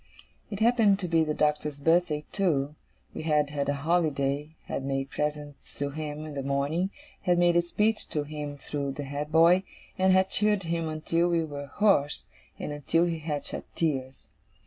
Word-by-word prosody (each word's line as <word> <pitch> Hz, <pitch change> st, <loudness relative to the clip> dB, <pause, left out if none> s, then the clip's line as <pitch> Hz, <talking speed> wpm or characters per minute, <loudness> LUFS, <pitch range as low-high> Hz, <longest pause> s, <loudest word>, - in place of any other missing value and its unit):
It 200 Hz, 0 st, -5 dB
happened 225 Hz, -4 st, +5 dB
to 190 Hz, -2 st, -3 dB
be 165 Hz, -1 st, +3 dB
the 155 Hz, -1 st, -1 dB
Doctor's 150 Hz, -1 st, 0 dB
birthday, 160 Hz, -1 st, +2 dB
too. 150 Hz, -8 st, +1 dB, 0.4 s
We -, -, -5 dB
had 150 Hz, -2 st, +1 dB
had 140 Hz, -1 st, -1 dB
a 145 Hz, -, +1 dB
holiday, 150 Hz, -3 st, 0 dB
had -, -, -4 dB
made 135 Hz, 0 st, -2 dB
presents 150 Hz, -1 st, -4 dB
to 140 Hz, 0 st, -2 dB
him 150 Hz, 0 st, -5 dB
in 155 Hz, -, -7 dB
the 140 Hz, -, -3 dB
morning, 140 Hz, +7 st, 0 dB, 0.3 s
had 180 Hz, -2 st, +2 dB
made 175 Hz, 0 st, +4 dB
a 175 Hz, -, +6 dB
speech 210 Hz, +5 st, 0 dB
to 150 Hz, -, -1 dB
him 145 Hz, -1 st, -6 dB
through 140 Hz, -1 st, -4 dB
the 145 Hz, -, -5 dB
head 145 Hz, +2 st, -4 dB
boy, 165 Hz, +3 st, +6 dB, 0.4 s
and 190 Hz, 0 st, +4 dB
had 190 Hz, 0 st, +3 dB
cheered 210 Hz, -2 st, +2 dB
him 165 Hz, -1 st, -1 dB
until 165 Hz, +2 st, 0 dB
we 170 Hz, -1 st, +2 dB
were 145 Hz, -2 st, -6 dB
hoarse, 150 Hz, -4 st, +2 dB, 0.3 s
and -, -, -5 dB
until 145 Hz, +4 st, +1 dB
he 165 Hz, -2 st, -2 dB
had 150 Hz, -2 st, -3 dB
shed -, -, -4 dB
tears. 135 Hz, -5 st, -2 dB
155 Hz, 185 wpm, -28 LUFS, 145-175 Hz, 0.4 s, a